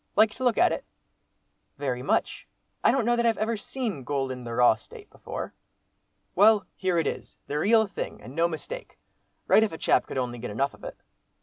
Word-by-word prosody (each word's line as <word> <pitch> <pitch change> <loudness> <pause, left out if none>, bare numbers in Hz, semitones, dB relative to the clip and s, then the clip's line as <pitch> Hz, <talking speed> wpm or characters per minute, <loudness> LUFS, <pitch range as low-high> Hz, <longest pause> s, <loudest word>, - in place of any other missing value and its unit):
Like 215 +1 +5
to 260 - -7
look 245 -2 +2
at 360 - +5
it?" - - -3 0.9
"Very 130 -3 -2
much. 130 - -1 0.4
I - - +6
don't 260 -4 +2
know 240 +1 +3
that 235 0 +1
I've 225 - +2
ever 225 +2 0
seen 215 - -4
gold 135 -1 -1
in 125 -1 -6
the 115 -1 -5
raw 125 -1 +6
state 110 -1 -14
before." - - -6 0.8
"Well, 210 +2 +5
here 185 -2 0
it 165 - +2
is—the 145 - -4
real 220 +5 +4
thing, 195 - -6
and 125 +5 -11
no 165 +3 +2
mistake. 445 - -7 0.5
Right - - +5
if 220 - +1
a 160 - -6
chap - - +2
could - - -5
only 120 -2 -2
get - - -5
enough 135 +7 -1
of - - -17
it." - - -7
170 Hz, 205 wpm, -27 LUFS, -, 0.9 s, I